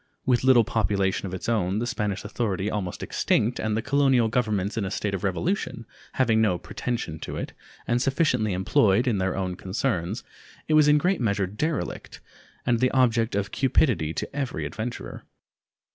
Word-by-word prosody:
With 125 -2 +2
little 130 -3 +6
population 100 -3 0
of 90 - -7
its 90 - -6
own, 100 -4 +1
the 115 - -1
Spanish 105 -6 -2
authority 105 -2 -2
almost 95 -4 -4
extinct, 115 +3 0
and 110 0 -1
the 110 - -2
colonial 135 -5 +3
governments 110 -4 0
in 115 - -1
a 95 - -2
state 100 +1 -2
of 95 - -3
revolution, 115 - -2 0.3
having 115 -4 +3
no 105 -5 +2
pretension 90 -3 -4
to - - -6
it, - - -5 0.3
and 120 +1 +1
sufficiently 130 - +1
employed 95 +4 +3
in 115 -6 +1
their 95 0 -1
own 95 -1 -2
concerns, 95 +1 -2 0.4
it 155 - +1
was 155 -1 +6
in 150 0 +6
great 180 +3 +1
measure 100 -3 +1
derelict, 105 - -3 0.5
and 120 -1 +2
the 130 - +3
object 115 -4 +2
of 100 0 -1
cupidity 120 - +2
to 110 - -5
every 140 -3 -2
adventurer. 115 +2 -6
110 Hz, 175 wpm, -25 LUFS, 95-125 Hz, 0.5 s, little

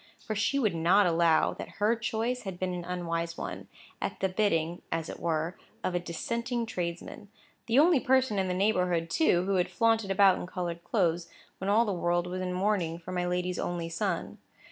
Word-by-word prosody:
For 215 - -5
she 220 +6 +1
would 220 -9 +2
not 175 +5 +4
allow 165 -2 +3
that - - -8
her 210 +3 +3
choice 235 +2 -2
had 190 -3 -6
been 185 0 -2
an 175 -1 -4
unwise 170 -2 -3
one, - - -6 0.3
at - - -3
the 190 - +1
bidding 175 -4 0
(as 165 0 -2
it - - -7
were) 165 +1 -1 0.3
of 185 - -1
a 175 - +1
dissenting 235 +8 -3
tradesman; 180 0 -5 0.4
the 235 +2 +2
only 315 0 +6
person 255 -5 +2
in 190 - 0
the 180 - -1
neighbourhood, 180 -4 +1
too, 180 - +3
who 195 0 +1
had 180 0 +1
flaunted 225 +2 +2
about 195 -1 +5
in - - -6
coloured 175 -2 -4
clothes, 170 -5 0 0.3
when 190 - -2
all 220 +3 +4
the 205 - -1
world 175 0 0
was 180 +1 -4
in 185 0 -2
mourning 180 -3 0
for 170 +2 -9
my 180 -1 -1
lady's 180 0 -1
only 170 -1 -2
son. 170 +1 -2
180 Hz, 200 wpm, -29 LUFS, 170-210 Hz, 0.4 s, only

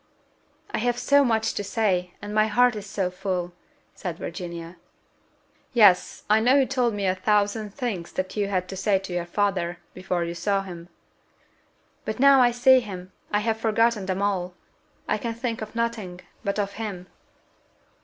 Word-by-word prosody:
"I - - -1
have 240 +1 0
so 280 +3 +4
much 225 -3 +1
to 205 - -3
say, 190 -4 0
and 205 0 -5
my 215 0 +3
heart 245 +2 +3
is 210 -1 -6
so 190 -2 -2
full!" 180 -2 -3 0.4
said 175 -3 -5
Virginia. 170 -1 -7 1.0
"Yes, 205 -6 +4
I 215 +1 +5
know 245 +4 +4
you 275 -1 +5
told 245 -4 0
me 200 -1 -2
of 185 0 +1
a - - -20
thousand 210 0 +1
things 215 -11 -3
that 185 0 -3
you 205 -2 0
had 185 -2 -1
to 195 - -5
say 195 +1 +2
to 190 -1 -6
your 175 -1 -2
father, 180 -3 0 0.2
before 185 -1 -2
you 170 0 -3
saw 195 +3 0
him." 175 -2 -9 1.1
"But 215 - -4
now 275 0 +7
I 245 - +6
see 250 +2 +5
him, 185 -5 -8 0.2
I 210 - +2
have 220 0 -1
forgotten 225 -2 +2
them 190 +1 -1
all. 185 -3 -1 0.5
I - - 0
can 230 -2 -3
think 230 -1 -3
of 215 +1 -7
nothing 220 -6 -3 0.2
but 200 +1 -1
of 200 -1 -1
him." 200 -5 -5
205 Hz, 180 wpm, -25 LUFS, 185-225 Hz, 1.1 s, now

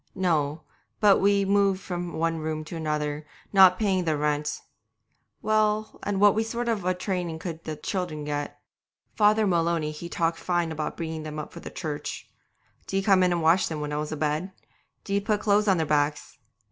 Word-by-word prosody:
No, 160 -5 0 0.4
but 205 -2 +5
we 200 0 +3
moved 195 -1 +2
from 175 -2 -5
one 165 0 -1
room 155 0 -3
to 165 +2 -8
another, 150 -2 -2 0.3
not 190 -2 +7
paying 195 -4 +1
the 160 -3 0
rent. 150 0 -1 0.8
Well, 215 0 +1
and 200 -1 -2
what 205 +2 +5
sort 235 +2 -3
of 220 -5 0
a 185 0 +1
training 180 -3 -3
could 165 -1 -7
the 155 - -4
children 155 -1 -3
get? 145 0 -4 0.6
Father 215 0 +4
Maloney 170 -4 +1
he 160 +3 -8
talked 165 -1 -1
fine 175 -2 0
about 155 -1 -4
bringing 160 -1 -4
them 155 0 -6
up 150 - -6
for - - -8
the - - -8
Church. 150 -2 -5 0.6
Did - - -4
he 195 - 0
come 195 -2 +4
in 180 -1 +3
and 170 -2 0
wash 165 +4 +4
them 160 -2 -4
when 150 0 -4
I - - -1
was 150 0 -3
a 155 - -3
bed? 155 +5 -1 0.5
Did 200 - -4
he 200 - +3
put 210 +1 -1
clothes 210 0 +2
on 190 -2 +4
their 160 - 0
backs? 150 0 -1
170 Hz, 195 wpm, -26 LUFS, 155-195 Hz, 0.8 s, not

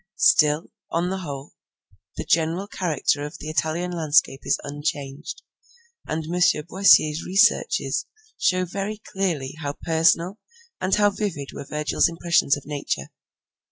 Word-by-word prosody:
Still, 150 +1 +4 0.2
on 175 +2 -1
the 190 - -2
whole, 140 -5 -7 0.6
the - - -4
general 165 +4 +1
character 155 -6 -1
of 150 - -7
the 155 - -7
Italian 165 +3 -1
landscape 150 -5 +2
is - - +2
unchanged, 145 0 -5 0.6
and 160 +1 -2
M. 175 +3 -2 0.3
Boissier's 170 -4 +4
researches 195 - +2 0.3
show 185 0 +1
very 200 +4 -4
clearly 185 -10 -3
how 145 -2 -3
personal 170 +4 +2 0.4
and 185 +1 +1
how 205 -1 +4
vivid 180 -10 -4
were - - -7
Virgil's 150 +2 +1
impressions 170 -4 +2
of 145 - -11
nature. 145 -1 -4
165 Hz, 130 wpm, -24 LUFS, 150-185 Hz, 0.6 s, Still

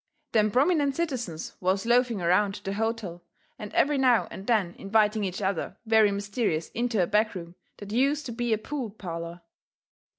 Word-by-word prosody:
Them 215 -2 +3
prominent 280 - +2
citizens 245 - -3
was 190 +3 0
loafing 240 -4 +2
around 195 +4 +2
the 195 - -3
hotel 215 -5 -3 0.4
and 210 -1 -7
every 290 0 +2
now 250 -3 +4
and 195 - -9
then 210 -8 +2
inviting 210 +1 +2
each 190 +1 -3
other 190 -3 -2
very 220 -2 +4
mysterious 200 -5 -2
into 235 -5 0
a - - +2
back 210 +2 +1
room 170 -1 -7 0.2
that 205 0 -9
use 275 +6 +2
to 260 - -6
be 240 0 -2
a 220 - +3
pool 255 +2 -5
parlour. 170 -4 -7
215 Hz, 170 wpm, -27 LUFS, 195-240 Hz, 0.4 s, now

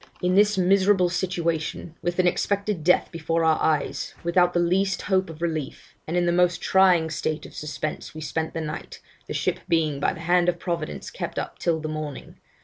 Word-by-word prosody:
'In 180 0 +1
this 205 +1 +4
miserable 190 0 +4
situation, 170 -3 -2
with 175 0 -2
an 185 - +3
expected 200 0 0
death 180 +3 +3
before 165 0 -1
our 160 -1 +3
eyes, 155 -2 0
without 175 +1 +3
the 175 - +1
least 185 +2 +1
hope 190 -2 +1
of 165 +1 -8
relief, 155 -4 -4
and 165 +3 -1
in 175 - +2
the 175 - +2
most 180 0 +2
trying 180 -4 +4
state 155 0 -2
of - - -12
suspense, 150 +1 -5
we 155 - -6
spent 160 +1 -3
the 165 - -2
night, 155 -1 -6 0.3
the - - -4
ship - - 0
being 155 -4 +1
by - - +2
the 165 - -8
hand 175 +1 +3
of 175 - -1
Providence 170 -3 -4
kept - - -5
up - - -4
till 165 -2 +1
the 155 - -4
morning. 155 -3 -6
170 Hz, 200 wpm, -25 LUFS, 160-180 Hz, 0.3 s, this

